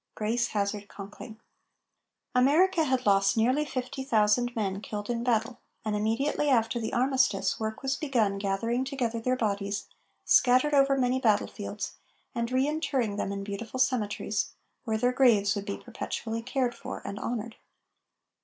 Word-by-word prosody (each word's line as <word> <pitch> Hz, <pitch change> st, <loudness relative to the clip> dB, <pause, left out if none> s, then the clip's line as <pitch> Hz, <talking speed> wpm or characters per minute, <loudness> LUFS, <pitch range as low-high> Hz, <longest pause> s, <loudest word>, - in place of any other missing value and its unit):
GRACE 230 Hz, +3 st, 0 dB
HAZARD 205 Hz, 0 st, -2 dB
CONKLING. 210 Hz, +3 st, -10 dB, 0.9 s
America 315 Hz, +7 st, +4 dB
had 260 Hz, -2 st, 0 dB
lost 195 Hz, +1 st, +3 dB
nearly 255 Hz, +7 st, +3 dB
fifty 265 Hz, -1 st, -4 dB
thousand 240 Hz, 0 st, +2 dB
men 200 Hz, -3 st, -2 dB
killed 210 Hz, +1 st, -4 dB
in 235 Hz, 0 st, -2 dB
battle, 235 Hz, 0 st, 0 dB, 0.3 s
and 215 Hz, -1 st, 0 dB
immediately 250 Hz, +8 st, 0 dB
after 235 Hz, -2 st, +2 dB
the 220 Hz, -, -3 dB
armistice, 255 Hz, -5 st, +1 dB
work 220 Hz, +3 st, -4 dB
was 270 Hz, 0 st, 0 dB
begun 230 Hz, -10 st, 0 dB
gathering 230 Hz, +6 st, 0 dB
together 250 Hz, -4 st, -2 dB
their 255 Hz, +3 st, 0 dB
bodies, 200 Hz, -3 st, -2 dB, 0.4 s
scattered 255 Hz, +4 st, +4 dB
over 275 Hz, -1 st, +4 dB
many 255 Hz, 0 st, +2 dB
battlefields, 215 Hz, -4 st, -1 dB, 0.4 s
and 235 Hz, -1 st, -2 dB
re 260 Hz, +2 st, +2 dB
interring 280 Hz, -9 st, -1 dB
them 200 Hz, -, -2 dB
in 200 Hz, 0 st, -4 dB
beautiful 210 Hz, +5 st, -5 dB
cemeteries, 210 Hz, -5 st, 0 dB, 0.3 s
where 220 Hz, -2 st, 0 dB
their 245 Hz, +3 st, +1 dB
graves 220 Hz, -7 st, +4 dB
would 205 Hz, 0 st, -5 dB
be 200 Hz, -, -3 dB
perpetually 230 Hz, -1 st, -5 dB
cared 250 Hz, 0 st, -1 dB
for -, -, -7 dB
and 200 Hz, -, -5 dB
honored. 235 Hz, -1 st, -4 dB
235 Hz, 150 wpm, -28 LUFS, 210-260 Hz, 0.9 s, America